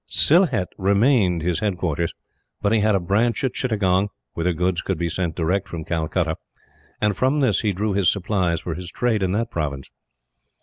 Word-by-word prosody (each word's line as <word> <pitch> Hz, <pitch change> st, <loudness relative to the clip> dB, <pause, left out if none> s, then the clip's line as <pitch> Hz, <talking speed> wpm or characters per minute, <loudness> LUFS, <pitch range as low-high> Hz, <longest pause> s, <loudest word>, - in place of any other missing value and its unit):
Sylhet 140 Hz, -, +3 dB
remained 100 Hz, -, +3 dB
his 85 Hz, -1 st, 0 dB
headquarters; 85 Hz, -5 st, -1 dB, 0.5 s
but 100 Hz, -, 0 dB
he 115 Hz, -, +4 dB
had 105 Hz, 0 st, +3 dB
a -, -, +2 dB
branch 105 Hz, +8 st, 0 dB
at 130 Hz, -, 0 dB
Chittagong, 100 Hz, -5 st, +1 dB, 0.2 s
whither 85 Hz, +2 st, 0 dB
goods 90 Hz, +1 st, 0 dB
could 95 Hz, -, -2 dB
be 85 Hz, +1 st, -1 dB
sent 85 Hz, -1 st, -2 dB
direct 90 Hz, +4 st, 0 dB
from 85 Hz, -3 st, -6 dB
Calcutta, 80 Hz, 0 st, -1 dB, 0.6 s
and 105 Hz, -1 st, +1 dB
from 130 Hz, +8 st, +1 dB
this 125 Hz, -9 st, +2 dB
he 105 Hz, -, +1 dB
drew 100 Hz, +2 st, -1 dB
his 95 Hz, -2 st, +3 dB
supplies 95 Hz, -4 st, -1 dB
for 85 Hz, -, -4 dB
his 90 Hz, +1 st, -7 dB
trade 115 Hz, -2 st, 0 dB
in 95 Hz, -1 st, 0 dB
that 115 Hz, +2 st, -1 dB
province. 70 Hz, -4 st, -4 dB
95 Hz, 180 wpm, -22 LUFS, 85-105 Hz, 0.6 s, he